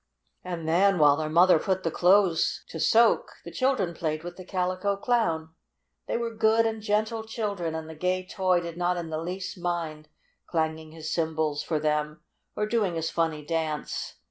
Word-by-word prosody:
And 175 -3 -5
then, 190 +4 +4
while 145 -3 +6
their 155 0 -3
mother 170 +1 +5
put 190 +1 -1
the 165 - 0
clothes 180 -1 +3
to 160 - -6
soak, 230 +8 +4
the - - -7
children 255 -10 0
played 155 -1 -3
with 175 - -7
the 185 - -9
Calico 185 +2 -1
Clown. 180 -9 0 0.5
They - - 0
were 235 -1 -3
good 220 +1 +3
and 220 -1 -2
gentle 220 +2 0
children, 205 -7 -3
and 160 0 -5
the 160 - -8
gay 180 +3 -1
toy 185 -2 +1
did 170 -1 -7
not 180 0 0
in 165 -2 -5
the 155 0 -2
least 185 +2 -5
mind 165 -3 -3 0.4
clanging 160 -1 -2
his 155 -1 -5
cymbals 160 -3 0
for 155 -2 -1
them 150 0 -1 0.3
or 210 - 0
doing 210 -5 0
his 160 0 -2
funny 160 -3 -1
dance. 160 -2 -3
175 Hz, 180 wpm, -27 LUFS, 160-200 Hz, 0.5 s, while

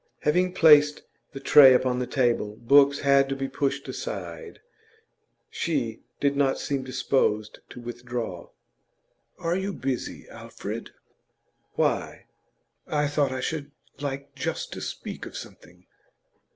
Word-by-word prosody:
Having 180 +4 +2
placed 150 -3 +6 0.3
the 135 - -7
tray 135 -1 +8
upon 125 0 +1
the 125 - -2
table 120 -5 0
books 140 +4 +4
had 140 -1 +4
to 135 - -1
be 135 0 -3
pushed 140 0 -2
aside - - -6 0.9
she - - -2 0.2
did 140 0 +1
not 140 -1 +2
seem 140 -2 -2
disposed 130 -4 0
to 125 - -10
withdraw. 120 -5 -6 0.9
'Are 170 +1 -1
you 190 +2 -2
busy, 135 -5 -4
Alfred?' - - -7 0.8
'Why?' - - -1 0.6
'I 150 -1 0
thought 145 -2 +1
I 130 0 -3
should 145 0 -3 0.3
like 140 0 -5
just 135 - -4
to - - -7
speak - - -6
of - - -8
something. 90 +2 -12
135 Hz, 125 wpm, -26 LUFS, 125-145 Hz, 0.9 s, tray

